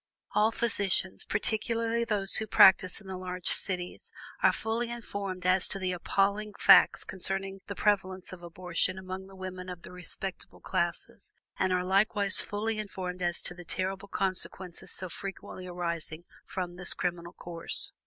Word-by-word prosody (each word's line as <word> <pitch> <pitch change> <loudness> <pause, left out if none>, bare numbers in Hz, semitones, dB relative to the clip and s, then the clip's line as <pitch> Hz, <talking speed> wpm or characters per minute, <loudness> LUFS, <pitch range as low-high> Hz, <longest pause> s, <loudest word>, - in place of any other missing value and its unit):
All 215 +2 +3
physicians, 200 -5 0
particularly 230 +2 0
those 205 -4 +2
who 220 - -1
practice 190 0 +6
in - - -16
the 190 -1 -5
large 180 -1 -3
cities, 180 -2 -1 0.3
are - - +6
fully 230 +2 -2
informed 200 -6 -5
as 185 0 +4
to - - 0
the 185 -1 -1
appalling 200 +4 0
facts - - +7
concerning 195 +1 -2
the 200 - -5
prevalence 190 -3 0
of 180 - -10
abortion 180 +1 -2
among 190 0 -6
the 195 - -14
women 185 -1 -6
of 180 -1 -8
the - - -10
"respectable" 180 +1 -5
classes, - - -3 0.2
and 185 0 +2
are 180 0 +2
likewise 200 +1 +4
fully 215 +1 -2
informed 185 -3 -5
as 175 -1 0
to - - -1
the 175 0 -11
terrible 190 +3 -3
consequences 185 -2 -3
so 185 - -4
frequently 185 0 -7
arising 170 -2 -3 0.2
from 180 -1 -4
this 180 -1 +1
criminal 175 -1 -3
course. 170 -1 0
190 Hz, 155 wpm, -30 LUFS, 180-200 Hz, 0.3 s, facts